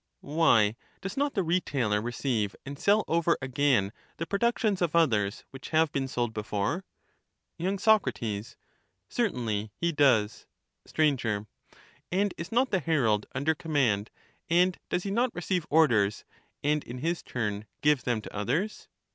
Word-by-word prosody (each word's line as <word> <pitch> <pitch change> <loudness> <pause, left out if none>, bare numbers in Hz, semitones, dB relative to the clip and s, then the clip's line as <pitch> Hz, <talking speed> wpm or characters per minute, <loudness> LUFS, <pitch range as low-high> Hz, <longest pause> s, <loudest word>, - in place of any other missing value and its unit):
Why, 115 -10 +4 0.2
does 195 +1 -5
not 285 +1 0
the 195 - +1
retailer 135 - 0
receive 115 -3 -1
and 140 +1 -7
sell 205 +1 +3
over 170 +1 +2
again 130 -6 +1 0.3
the 165 - -3
productions 210 +1 0
of 170 -2 0
others, 110 -11 +2
which 135 -1 -9
have 160 -1 +3
been 135 -1 -1
sold 120 -3 -2
before? 105 - -2 0.7
y. 185 +4 0
Soc, 215 +1 +4 1.0
Certainly 115 - -1
he 170 - 0
does. 125 -8 +2 0.4
Str. 155 - 0 1.1
And 195 +2 +1
is 170 +3 -7
not 250 +3 +2
the 190 - +2
herald 120 -12 +1
under 140 +4 +1
command, 135 -11 0 0.4
and 180 +2 +4
does 180 - -1
he 195 - -3
not 235 +3 +1
receive 175 -1 -2
orders, 115 -10 +3 0.4
and 150 +1 +1
in 120 - -8
his 165 +6 -1
turn 105 -3 -3 0.2
give 150 -2 +3
them 120 -4 -1
to - - -10
others 145 - -2
150 Hz, 145 wpm, -28 LUFS, 115-180 Hz, 1.1 s, Why